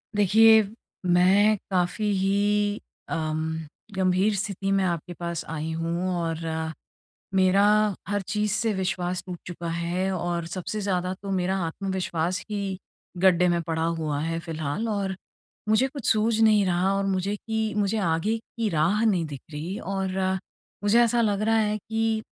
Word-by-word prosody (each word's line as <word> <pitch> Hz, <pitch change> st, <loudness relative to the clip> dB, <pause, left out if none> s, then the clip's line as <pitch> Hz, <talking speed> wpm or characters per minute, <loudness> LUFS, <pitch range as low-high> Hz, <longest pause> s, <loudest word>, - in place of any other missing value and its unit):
देखिए, 220 Hz, +2 st, +6 dB, 0.4 s
मैं 190 Hz, +4 st, +4 dB
काफ़ी 180 Hz, +3 st, 0 dB
ही 205 Hz, +2 st, +1 dB, 0.3 s
अम, 160 Hz, 0 st, -2 dB, 0.3 s
गंभीर 190 Hz, +2 st, +2 dB
स्थिति 195 Hz, 0 st, -2 dB
में 195 Hz, -1 st, +2 dB
आपके 175 Hz, -1 st, -2 dB
पास 170 Hz, -1 st, -4 dB
आई 160 Hz, 0 st, -3 dB
हूँ 170 Hz, +3 st, -2 dB
और 165 Hz, -1 st, -2 dB, 1.0 s
मेरा 190 Hz, +1 st, +4 dB, 0.4 s
हर 205 Hz, 0 st, 0 dB
चीज़ 210 Hz, +1 st, 0 dB
से 220 Hz, +2 st, +2 dB
विश्वास 180 Hz, -1 st, -2 dB
टूट 180 Hz, -1 st, -6 dB
चुका 175 Hz, -1 st, -6 dB
है 175 Hz, +3 st, -1 dB
और 175 Hz, -2 st, -2 dB
सबसे 185 Hz, +5 st, -4 dB
ज़्यादा 185 Hz, -2 st, -1 dB
तो 200 Hz, -1 st, -5 dB
मेरा 190 Hz, 0 st, 0 dB
आत्मविश्वास 180 Hz, -1 st, -2 dB
ही 200 Hz, -3 st, -3 dB, 0.4 s
गड्ढे 180 Hz, -1 st, +4 dB
में 170 Hz, -1 st, +1 dB
पड़ा 160 Hz, 0 st, -2 dB, 0.2 s
हुआ 150 Hz, -2 st, -1 dB
है, 165 Hz, +1 st, -2 dB
फ़िलहाल 165 Hz, +5 st, -3 dB
और 200 Hz, -2 st, -1 dB, 0.5 s
मुझे 220 Hz, +5 st, +4 dB
कुछ 275 Hz, -2 st, -8 dB
सूझ 220 Hz, +1 st, +2 dB
नहीं 215 Hz, -2 st, +5 dB
रहा 185 Hz, +2 st, +1 dB
और 195 Hz, -, 0 dB
मुझे 195 Hz, +1 st, 0 dB
कि, 220 Hz, 0 st, -2 dB
मुझे 205 Hz, +1 st, +1 dB
आगे 195 Hz, +3 st, +1 dB
की 225 Hz, -1 st, -4 dB
राह 175 Hz, +6 st, +2 dB
नहीं 185 Hz, -7 st, +2 dB
दिख 145 Hz, -4 st, -7 dB
रही 160 Hz, +6 st, -4 dB
और 190 Hz, -1 st, -3 dB, 0.7 s
मुझे 205 Hz, +3 st, +4 dB
ऐसा 235 Hz, 0 st, +2 dB
लग 205 Hz, -2 st, +1 dB
रहा 225 Hz, +1 st, +2 dB
है 215 Hz, -1 st, +1 dB
कि 220 Hz, +1 st, -1 dB
190 Hz, 155 wpm, -26 LUFS, 170-210 Hz, 1.0 s, देखिए